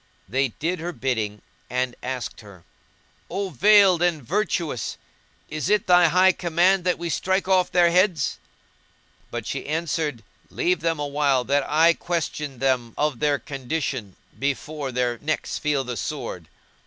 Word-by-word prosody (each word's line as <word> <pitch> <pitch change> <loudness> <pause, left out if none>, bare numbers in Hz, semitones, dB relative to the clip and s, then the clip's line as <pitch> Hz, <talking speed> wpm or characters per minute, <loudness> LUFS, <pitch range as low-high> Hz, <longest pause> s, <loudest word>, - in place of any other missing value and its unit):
They 135 +7 +1
did 165 +9 -3
her 175 +2 -4
bidding 110 -7 -2 0.3
and 125 0 -1
asked 125 -2 -5
her, 100 -5 -15 0.7
"O 195 +2 -2
veiled 200 -4 +5
and 170 -5 +1
virtuous! 170 - -2 0.5
is 155 -3 -3
it 210 -1 +3
thy 175 -1 +6
high 185 +3 +5
command 175 +2 +2
that 180 - +2
we 170 - -4
strike 190 +3 0
off 185 -2 +3
their 175 -1 +4
heads?"; 180 -5 +2 0.9
but - - -5
she - - -4
answered, 155 -5 -2 0.3
"Leave 180 0 0
them 165 -1 0
awhile 140 -2 +1
that 140 +2 0
I 165 +3 +5
question 150 -5 -3
them 125 -3 0
of 150 -5 0
their 145 -1 +2
condition, 135 - -4 0.2
before 140 +1 -2
their 125 -1 -1
necks 155 +1 -2
feel 150 -3 0
the 125 -1 -5
sword." - - -5
150 Hz, 145 wpm, -24 LUFS, 130-175 Hz, 0.9 s, thy